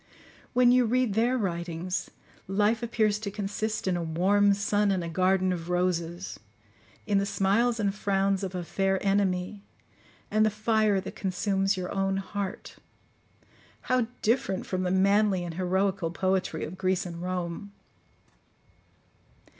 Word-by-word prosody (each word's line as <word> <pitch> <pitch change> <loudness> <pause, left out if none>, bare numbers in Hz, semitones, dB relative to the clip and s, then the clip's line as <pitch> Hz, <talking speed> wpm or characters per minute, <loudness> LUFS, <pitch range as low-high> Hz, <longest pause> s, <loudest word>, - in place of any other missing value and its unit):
When 245 -1 +5
you 250 0 +5
read 245 -1 +1
their 235 +4 +2
writings, 175 -3 -3 0.4
life 210 +4 +1
appears 215 -3 +1
to 215 -2 -4
consist 205 +1 -3
in 185 - +2
a 175 - -2
warm 190 +5 +3
sun 205 +1 +1
and 190 -3 0
a - - -4
garden 185 +2 +2
of 170 -1 -6
roses,—in 170 - -3
the 200 - 0
smiles 225 +5 +1
and 200 -2 +1
frowns 195 -1 0
of 190 -1 -4
a 180 - -3
fair 195 +2 0
enemy, 195 0 0 0.7
and 215 0 +3
the 215 - +4
fire 215 -1 +2
that 190 - -7
consumes 195 0 0
your 180 -1 -4
own 195 -1 0
heart. 195 0 -5 1.0
How 255 -2 +1 0.2
different 215 -5 +1
from 185 -1 -2
the 185 - 0
manly 195 0 +3
and 170 -1 -5
heroical 190 0 0
poetry 185 -2 -1
of 180 +4 -9
Greece 185 0 0
and 170 -1 -7
Rome! 180 +2 -4
195 Hz, 140 wpm, -28 LUFS, 180-210 Hz, 1.0 s, When